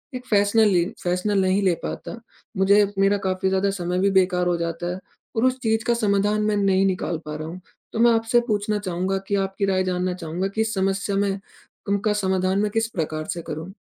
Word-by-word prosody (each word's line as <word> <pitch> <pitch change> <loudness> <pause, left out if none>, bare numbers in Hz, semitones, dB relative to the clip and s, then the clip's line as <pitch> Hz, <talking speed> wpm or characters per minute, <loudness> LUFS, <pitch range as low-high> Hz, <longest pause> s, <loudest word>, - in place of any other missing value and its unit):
एक 250 0 -6
फैसला 205 +1 +3
ले 195 -4 +4
एक 175 - -3
फैसला 180 +4 0
नहीं 190 +1 +2
ले 185 -2 +3
पाता, 235 - -6 0.4
मुझे 200 +2 +5
मेरा 195 +1 +4
काफ़ी 185 0 0
ज़्यादा 190 +1 +1
समय 180 -1 -2
भी 195 +1 +2
बेकार 180 -2 +2
हो 175 - +2
जाता 170 +1 -3
है 185 - -6 0.4
और 225 - +2
उस 255 0 +1
चीज 225 -1 +1
का 240 - +2
समाधान 210 -2 +1
मैं 210 0 +1
नहीं 195 -1 +3
निकाल 180 -3 -1
पा 150 0 -5
रहा 155 +1 -5
हूँ। 175 +3 -7 0.3
तो 225 - -3
मैं 235 +1 +6
आपसे 225 +2 +3
पूछना 210 0 0
चाहूँगा 185 0 -2
कि 200 - 0
आपकी 195 +1 -1
राय 190 -1 +1
जानना 180 0 -1
चाहूँगा 175 +2 -3
कि 220 - +1
इस 220 0 -1
समस्या 195 0 0
में 200 0 0 0.5
उनका 200 +1 +1
समाधान 190 -1 0
मैं 210 0 0
किस 225 +1 0
प्रकार 155 -5 -3
से 170 - -6
करूँ? 160 +3 -6
195 Hz, 215 wpm, -23 LUFS, 180-210 Hz, 0.5 s, मैं